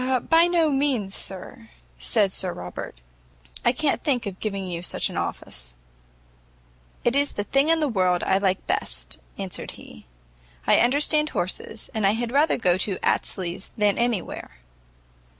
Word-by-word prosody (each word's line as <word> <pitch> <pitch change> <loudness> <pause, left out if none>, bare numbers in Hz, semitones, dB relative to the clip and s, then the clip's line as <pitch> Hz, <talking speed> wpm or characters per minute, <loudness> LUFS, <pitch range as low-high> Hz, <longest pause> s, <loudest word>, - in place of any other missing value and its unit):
"By 330 +1 +6
no 335 -3 +3
means, 265 -8 0
sir," 180 -15 -3 0.3
said 190 - +2
Sir 185 -2 +1
Robert, 90 -7 -7 0.6
"I - - +5
can't 280 +3 0
think 255 -6 +1
of 195 -2 -6
giving 195 -3 -3
you 175 -2 -4
such 175 - 0
an - - -8
office." 60 -1 -4 1.3
"It 240 - +2
is 285 0 +2
the 205 - -2
thing 275 +7 +2
in 330 -1 +4
the 300 - +2
world 185 -7 +1
I 190 0 +2
like 190 -2 0
best," - - -1 0.2
answered - - -5
he; - - -14 0.6
"I - - +5
understand 295 +4 +3
horses, 200 +3 -4
and 220 - -2
had 225 +4 +1
rather 290 +4 +3
go 180 -5 +2
to 195 -2 0
Astley's 185 +1 0
than 210 0 +2
any 235 -6 +1
where." 65 - -9
205 Hz, 155 wpm, -24 LUFS, 185-275 Hz, 1.3 s, By